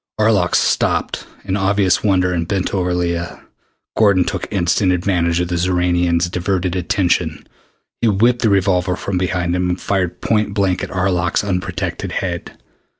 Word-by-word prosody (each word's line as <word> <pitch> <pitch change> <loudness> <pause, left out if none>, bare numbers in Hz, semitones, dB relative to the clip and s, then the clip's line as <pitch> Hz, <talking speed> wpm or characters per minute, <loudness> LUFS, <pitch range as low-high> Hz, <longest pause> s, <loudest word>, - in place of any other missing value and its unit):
Arlok 105 -5 +2
stopped - - 0 0.2
in 95 -1 -1
obvious 100 -1 +2
wonder 90 -3 +2
and 85 -1 -2
bent 95 -1 -1
over 90 -2 0
Leah. 85 -1 -2 0.6
Gordon 100 -4 +4
took - - -4
instant 90 +1 +1
advantage 90 -2 +1
of 90 0 -1
the 90 - -1
Xoranian's 90 -1 +1
diverted 90 0 -1
attention. 90 -3 0 0.6
He 120 - +3
whipped 115 +4 +2
the 110 - +3
revolver 95 -2 +2
from 95 -1 -3
behind 90 -1 -1
him 90 0 0
and 90 - -2
fired 90 -3 -1
point 105 -2 0
blank 95 -3 0
at - - -4
Arlok's 90 -2 0
unprotected 90 -3 -3
head. 85 -3 -4
90 Hz, 150 wpm, -18 LUFS, 90-100 Hz, 0.6 s, Gordon